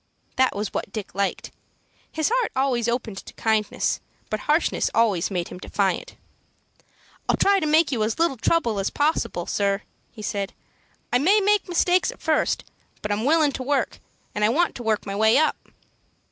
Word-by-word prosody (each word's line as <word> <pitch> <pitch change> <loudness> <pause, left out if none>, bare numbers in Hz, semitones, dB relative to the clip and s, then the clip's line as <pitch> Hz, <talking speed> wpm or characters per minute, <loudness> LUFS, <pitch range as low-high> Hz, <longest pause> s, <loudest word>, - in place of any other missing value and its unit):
That 260 -4 +2
was 205 0 -3
what - - -3
Dick 215 -2 -6
liked. 195 +1 -2 0.6
His 315 +5 0
heart - - +1
always 260 -3 +1
opened 230 -4 -2
to - - -12
kindness, 220 -1 0 0.3
but 215 - -1
harshness 305 +7 +1
always 215 -7 +2
made 180 -3 -3
him - - -9
defiant. 200 - -1 1.1
"I'll - - +3
try 395 0 +4
to 310 - -1
make 310 +1 +4
you 240 -5 -1
as 220 +1 -1
little 330 -5 +1
trouble 230 -5 +1
as 195 - 0
possible, 290 - 0
sir," 200 +1 0 0.3
he 215 - -10
said. 200 -1 -3 0.6
"I 245 - +5
may 385 +10 +4
make 410 -1 +2
mistakes 360 +1 +2
at - - -15
first, - - +1 0.4
but 210 - -2
I'm 210 +3 -1
willin' 310 0 +4
to 260 - -5
work, 275 +1 -1 0.3
and 210 - -1
I 210 - +5
want 335 +9 +2
to - - -7
work 220 -2 0
my 195 -1 -4
way 220 +4 +4
up." 310 +1 +1
235 Hz, 180 wpm, -24 LUFS, 210-310 Hz, 1.1 s, I